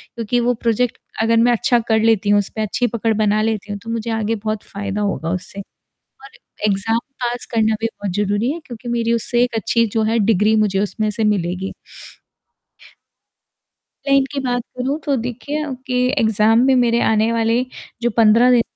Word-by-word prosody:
क्योंकि 235 +1 -1
वो 245 +1 +2
प्रोजेक्ट 235 +1 0 0.2
अगर 230 +1 +3
मैं 240 +1 +4
अच्छा 240 +1 +2
कर 220 -1 +3
लेती 220 -2 +2
हूँ, 205 0 +5
उस 200 - -2
पे 220 - -2
अच्छी 230 +3 0
पकड़ 225 -1 -1
बना 215 0 +2
लेती 215 -1 -2
हूँ 205 - -4
तो 230 - -8
मुझे 230 0 -3
आगे 225 0 -1
बहुत 215 0 -4
फ़ायदा 200 +1 -4
होगा 195 -5 -2
उससे। 185 +2 -5 0.7
और 275 - -12 0.4
एग्ज़ाम 210 +3 +1 0.2
पास 240 0 -2
करना 220 -1 +2
भी 225 - 0
बहुत 205 -4 -5
ज़रूरी 205 +4 0
है 335 - -6
क्योंकि 240 0 -9
मेरी 235 -1 0
उससे 240 +1 +1
एक 245 -2 0
अच्छी 230 +1 +1
जो 220 - +2
है 225 +1 +1
डिग्री 215 0 +3
मुझे 200 -2 +1
उसमें 210 +1 -1
से 215 +1 -2
मिलेगी। 190 -2 -1 2.3
क्लाइंट 275 -1 +3
की 280 - -2
बात 245 -2 -1
करूँ 270 +4 -1
तो 285 - +1
देखिए 255 +6 -4 0.2
कि 250 -1 -1 0.2
एग्ज़ाम 220 +2 +3
भी 265 - +4
मेरे 235 -1 +3
आने 220 +1 +2
वाले 230 +2 +1 0.4
जो 240 - +2
15 230 +3 +5
दिन 240 -2 +5
225 Hz, 185 wpm, -19 LUFS, 210-240 Hz, 2.3 s, हूँ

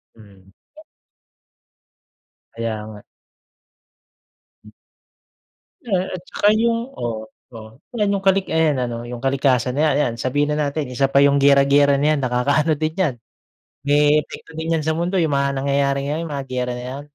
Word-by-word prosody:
Mm. 100 -3 -19 2.0
Kaya 110 -2 -4
nga. 105 -1 -10 2.9
Yeah, 190 -4 -1
at 175 - -8
saka 205 - 0
yung, 230 +2 0
oh, 110 -2 -4 0.2
oh, 110 -1 -10 0.2
yan 210 -3 0
yung 200 -1 -1
kali 195 0 +4
ayan 155 -5 +1
ano 120 -1 -4
yung 120 0 -7
kalikasan 135 -1 +1
ayan, 155 -1 +3
ayan 140 -5 +1
sabihin 145 +4 0
na 150 - -1
natin 140 -2 -3
isa 125 +2 0
pa 140 +1 +3
yung 140 0 +4
giyera-giyera 140 0 +4
na 150 0 +2
yan - - -2
nakakaano 140 +6 +1
din 155 +1 -2
yan, 165 -9 +1 0.7
may 145 +1 +4
epekto 155 - -9
din 160 +1 -2
yan 155 - -2
sa 160 - 0
mundo 170 +4 -2
yung 160 -5 +1
mga 140 0 0
nangyayari 140 0 +1
ngayon 165 +2 -3
mga 140 -2 -4
giyera 125 -1 -2
na 125 - -7
yan. 130 +3 -6
140 Hz, 155 wpm, -20 LUFS, 125-155 Hz, 2.9 s, kali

